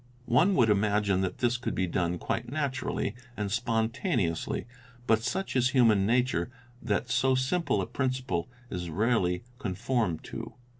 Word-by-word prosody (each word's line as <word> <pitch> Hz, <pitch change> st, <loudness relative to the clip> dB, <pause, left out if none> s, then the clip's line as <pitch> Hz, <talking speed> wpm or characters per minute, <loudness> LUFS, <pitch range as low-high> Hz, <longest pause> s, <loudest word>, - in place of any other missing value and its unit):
One 175 Hz, +12 st, +4 dB
would 115 Hz, -7 st, +4 dB
imagine 100 Hz, -2 st, +2 dB
that 95 Hz, -1 st, -2 dB
this 120 Hz, -1 st, +1 dB
could 120 Hz, -, -3 dB
be 95 Hz, -, +1 dB
done 90 Hz, 0 st, -1 dB
quite 115 Hz, +7 st, -3 dB
naturally 135 Hz, -7 st, -1 dB, 0.2 s
and 105 Hz, -2 st, -2 dB
spont 115 Hz, +2 st, 0 dB
aneously, 90 Hz, -, 0 dB, 0.4 s
but 110 Hz, -2 st, +3 dB
such 185 Hz, +10 st, -2 dB
is 125 Hz, 0 st, +4 dB
human 115 Hz, -8 st, +4 dB
nature 120 Hz, -6 st, +1 dB, 0.3 s
that 115 Hz, +3 st, -1 dB
so 130 Hz, 0 st, +3 dB
simple 130 Hz, +7 st, +1 dB
a -, -, -2 dB
principle 130 Hz, -9 st, -2 dB, 0.2 s
is 90 Hz, -1 st, -4 dB
rarely 95 Hz, -2 st, +1 dB, 0.2 s
conformed 110 Hz, -, -1 dB
to. -, -, -7 dB
115 Hz, 150 wpm, -29 LUFS, 95-130 Hz, 0.4 s, One